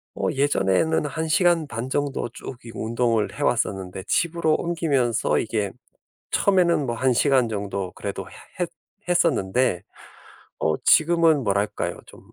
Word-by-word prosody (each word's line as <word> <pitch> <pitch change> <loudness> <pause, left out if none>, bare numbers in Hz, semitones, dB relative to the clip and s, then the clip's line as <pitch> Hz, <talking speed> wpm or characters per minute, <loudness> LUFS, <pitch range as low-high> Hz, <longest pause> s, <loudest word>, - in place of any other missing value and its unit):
어 - - -1
예전에는 140 - +1
1 160 +2 -3
시간 170 -1 +3
반 125 0 -5
정도 140 -3 -1
쭉 125 0 -8
이 115 - -8
운동을 115 0 0
해 - - -2
왔었는데 95 -1 -1
집으로 170 -2 +1
옮기면서 145 -9 0
이게 105 -3 -2 0.6
처음에는 175 -7 +3
뭐 120 -1 -2
1 130 +1 +2
시간 130 -2 +3
정도 100 -3 -3
그래도 - - -5
해 - - -15 0.3
했 175 - 0 0.4
했었는데. 130 - +1 0.8
어 80 -1 +2
지금은 165 -3 +4
뭐랄까요? 100 +1 -1
좀 - - -15
130 Hz, 275 characters per minute, -24 LUFS, 105-160 Hz, 0.8 s, 지금은